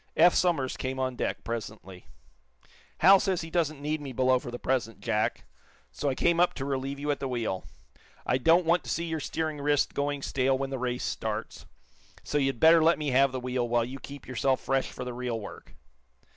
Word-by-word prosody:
Eph 175 +2 +7
Somers 160 -8 +1
came 130 0 -3
on 130 -1 -1
deck, - - -3
presently. 105 -6 -7 0.9
"Hal 195 +3 +8
says 190 -3 0
he 165 0 -8
doesn't 155 -4 0
need 150 +1 -2
me 140 -2 -6
below 130 0 +2
for 125 - -8
the 120 - -5
present, 120 -4 -2
Jack, 105 0 -1 0.5
so 145 - -2
I 130 - -1
came 170 +3 +2
up 175 - +3
to 135 - -4
relieve 135 0 -3
you 145 +1 -1
at 145 - -2
the 135 - -3
wheel. 115 -7 -3 0.6
I 130 - +1
don't 165 +6 +4
want 170 +2 +2
to - - -7
see 170 - -1
your 160 -1 -3
steering 155 0 -3
wrist 145 0 +1
going 140 -1 -2
stale 130 0 +1
when 135 0 -3
the 135 - -3
race 125 0 -2
starts, - - -4 0.6
so 150 - -1
you'd 135 -3 0
better 160 0 +7
let 165 +1 +4
me 150 -2 -2
have 135 +1 +4
the 130 - -3
wheel, 125 -1 -2
while 120 -1 +2
you 130 +3 -7
keep 140 0 -10
yourself 130 +1 +1
fresh 135 -1 0
for 125 - -7
the 125 - -5
real 120 -2 -3
work." 105 - -11
135 Hz, 215 wpm, -28 LUFS, 125-155 Hz, 0.9 s, Hal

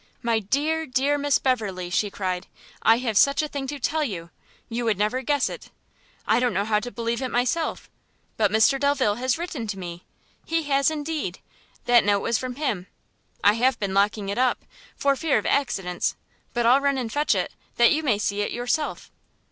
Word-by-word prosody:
"My 230 -1 +2
dear, 300 +9 -1
dear 275 +3 +1
Miss 285 -1 +3
Beverley!" 200 -9 -1
she 205 +3 +1
cried, 185 -2 -3 0.3
"I 225 +1 +5
have 230 -4 +1
such 280 +2 +4
a - - -1
thing 280 -2 -5
to 290 +2 -4
tell 305 +3 0
you! 170 - -5 0.4
you 240 +1 -3
would 220 -4 +1
never 215 +6 0
guess 285 +2 +1
it, - - -8 0.6
I 220 +2 +3
don't 245 -5 0
know 200 +2 +1
how 210 -1 +2
to 245 - -6
believe 235 +1 -3
it 260 - -2
myself, 245 +8 -1 0.5
but 210 -2 +2
Mr 220 +6 +4
Delvile 275 -7 +2
has 255 +1 +1
written 320 -9 -5
to 205 -2 -4
me! 175 -1 -7 0.4
he 330 0 -1
has 275 -1 +2
indeed! 300 - -3 0.5
that 240 -1 +5
note 200 0 +2
was 235 - 0
from 255 -1 -5
him. 225 -11 -2 0.6
I 205 - +6
have 250 +4 +2
been 200 -2 -3
locking 200 0 +1
it 200 - -2
up, 255 -1 +1 0.3
for 280 0 +2
fear 310 +1 +1
of - - -2
accidents, 190 -10 0 0.4
but 240 -1 0
I'll 255 +4 +5
run 280 -1 +1
and 235 -4 -3
fetch 295 +1 +2
it, - - -1 0.2
that 240 0 +5
you 315 - +2
may 255 -9 +1
see 205 0 -1
it 205 - -1
yourself." 245 +5 -2
245 Hz, 200 wpm, -24 LUFS, 205-280 Hz, 0.6 s, I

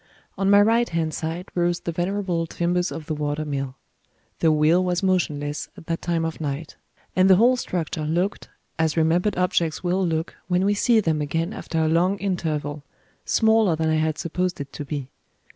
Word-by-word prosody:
On 195 0 0
my 200 0 +7
right 230 +3 +3
hand 165 -2 -1
side 165 +4 -4
rose 175 0 0
the 170 - -3
venerable 175 -1 -1
timbers 175 +2 0
of 160 - -6
the 160 - -3
water 150 0 -2
mill. 135 -3 -3 0.6
The 160 - +4
wheel 155 +4 +4
was 180 0 -1
motionless, 150 -6 -1
at - - -12
that 165 0 -3
time 170 -2 0
of 160 0 -5
night; 145 +1 -4 0.4
and 185 +1 +4
the 190 - +8
whole 240 +6 +5
structure 165 -9 -3
looked 175 +6 -1 0.3
as 160 0 +1
remembered 175 +5 +2
objects 175 -3 0
will 185 +2 +1
look, 165 -1 -1
when 180 +1 +1
we 205 - +3
see 220 +2 +3
them 160 -5 0
again 165 +3 -1
after 165 - -5
a 160 0 +2
long 175 +5 +2
interval 155 -7 -2 0.4
smaller 220 -5 +3
than 160 0 0
I 155 - +2
had 155 0 0
supposed 180 +2 -2
it 140 -1 -7
to - - -5
be. 140 -2 -5
170 Hz, 190 wpm, -24 LUFS, 155-185 Hz, 0.6 s, the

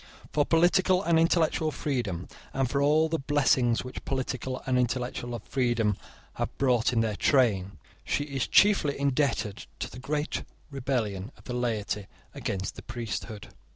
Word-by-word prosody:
For 145 -1 +2
political 180 +3 +4
and 170 -3 +3
intellectual 165 -1 +2
freedom, 120 - -2 0.3
and 135 -1 +1
for 140 +3 0
all 155 +3 +4
the 160 0 -1
blessings 135 -4 +2
which 125 - -7
political 130 -1 -3
and 130 -1 +2
intellectual 120 -1 -2
freedom 120 -5 +1 0.4
have - - -3
brought 125 -3 +3
in 115 -2 +2
their 110 -2 0
train, 100 -7 +2 0.3
she 145 - 0
is 140 -3 -2
chiefly 195 -9 +4
indebted 140 -7 0
to - - -5
the 125 - -9
great 150 +3 -2 0.3
rebellion 120 -6 -2
of - - -18
the 125 - -5
laity 110 -5 -2 0.3
against 95 -1 -3
the - - -7
priesthood. 115 -3 -5
130 Hz, 150 wpm, -28 LUFS, 115-145 Hz, 0.4 s, political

